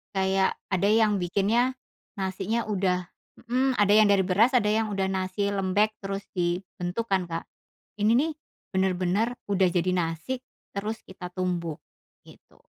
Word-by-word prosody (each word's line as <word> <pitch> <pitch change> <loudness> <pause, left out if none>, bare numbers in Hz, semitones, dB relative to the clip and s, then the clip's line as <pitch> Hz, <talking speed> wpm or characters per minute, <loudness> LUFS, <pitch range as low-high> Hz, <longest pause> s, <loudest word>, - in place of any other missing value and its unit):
kayak 190 0 +2 0.2
ada 190 +1 +2
yang 215 -1 +4
bikinnya 210 +8 +1 0.4
nasinya 195 +4 -1
udah 185 -3 0 0.4
hmm, 255 +2 +2
ada 205 -1 +4
yang 215 0 +7
dari 200 -1 +4
beras, 210 +8 +3
ada 210 -4 +4
yang 220 0 +1
udah 195 -1 0
nasi 190 +1 -1
lembek 200 +2 +1
terus 195 0 -4
dibentuk 180 +3 -2
kan 190 -2 +2
Kak. 165 0 -4 0.6
Ini 210 +2 +3
nih, 300 +6 +2 0.4
benar-benar 190 +4 +1 0.2
udah 190 -2 +4
jadi 180 +1 +1
nasi, 175 +8 -2 0.3
terus 210 +3 -4
kita 185 -1 -8
tumbuk. 175 -4 -2 0.4
Gitu. - - -19
195 Hz, 140 wpm, -27 LUFS, 185-215 Hz, 0.6 s, yang